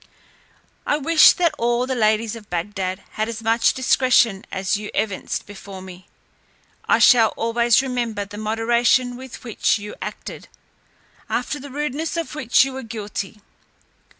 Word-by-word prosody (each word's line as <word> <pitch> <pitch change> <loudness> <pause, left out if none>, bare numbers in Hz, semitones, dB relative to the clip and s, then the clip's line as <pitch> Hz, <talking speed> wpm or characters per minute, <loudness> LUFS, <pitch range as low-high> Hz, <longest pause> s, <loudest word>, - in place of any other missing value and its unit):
I 295 - +1
wish 315 +2 +6
that 340 -3 +1
all 240 +1 +1
the 260 - -2
ladies 220 -1 +1
of 215 -2 -12
Bagdad 185 +2 -3
had 215 +1 -2
as 230 0 -6
much 230 +1 +2
discretion 245 -5 +3
as 190 +2 -1
you 210 +1 -5
evinced 205 -3 -2
before 200 -1 -10
me. 185 -1 -12 0.8
I - - +5
shall 230 -4 +5
always 235 +2 +2
remember 240 -5 -2
the 205 +1 -10
moderation 235 +3 +1
with 260 0 -10
which 230 -2 +1
you 210 0 -8
acted, - - -7 0.8
after 275 +4 -2
the 285 +2 -9
rudeness 295 +4 -3
of 335 - -3
which 265 -3 +3
we 270 - -5
were 265 0 -6
guilty. 210 -2 -6
230 Hz, 150 wpm, -21 LUFS, 210-255 Hz, 0.8 s, wish